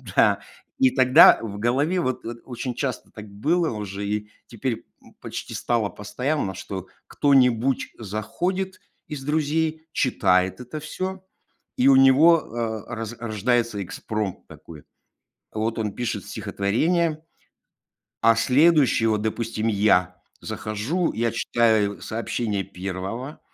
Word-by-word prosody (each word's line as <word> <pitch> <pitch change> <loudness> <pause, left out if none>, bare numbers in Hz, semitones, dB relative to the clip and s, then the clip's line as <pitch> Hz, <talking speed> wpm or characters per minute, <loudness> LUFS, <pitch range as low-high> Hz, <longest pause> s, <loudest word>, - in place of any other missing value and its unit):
Да. - - +4 0.4
И 265 -1 +6
тогда 130 - +7
в 100 -3 -6
голове 140 - +1
вот 130 -3 -2
от 115 +1 -6
очень 125 0 -5
часто 130 0 -3
так 105 -2 -10
было 155 - 0
уже 100 -2 -5
и 105 0 -3 0.2
теперь, 120 0 -4 0.2
м, - - -19
почти - - -6
стало 115 -4 0
постоянно, 105 +2 -3
что 95 -1 -6 0.2
кто-нибудь 130 -2 +2
заходит 175 - -3 0.3
из 145 -4 -6
друзей, 155 +2 -1
читает 95 -6 +2
это 125 +5 -7
всё, 185 +4 -5 0.5
и 125 - +3
у 135 - +7
него, 140 +6 +6 0.5
э, - - -9
роз 115 0 -5
рождается 115 -1 0
экспромт 105 +1 -5
такой. 75 -3 -13 0.7
Вот 110 +2 -2
он 105 -2 -2
пишет 110 -6 -3
стихотворение, 155 - 0 1.0
а 115 0 +5
следующие- 135 -2 +4
вот, 105 -1 0
допустим, 110 0 -2
я- 95 -4 +2 0.2
захожу, 120 - -2
я 115 +1 0
читаю 110 -4 +1
сообщение 110 -2 -2
1, 95 +10 -6
115 Hz, 120 wpm, -24 LUFS, 105-145 Hz, 1.0 s, тогда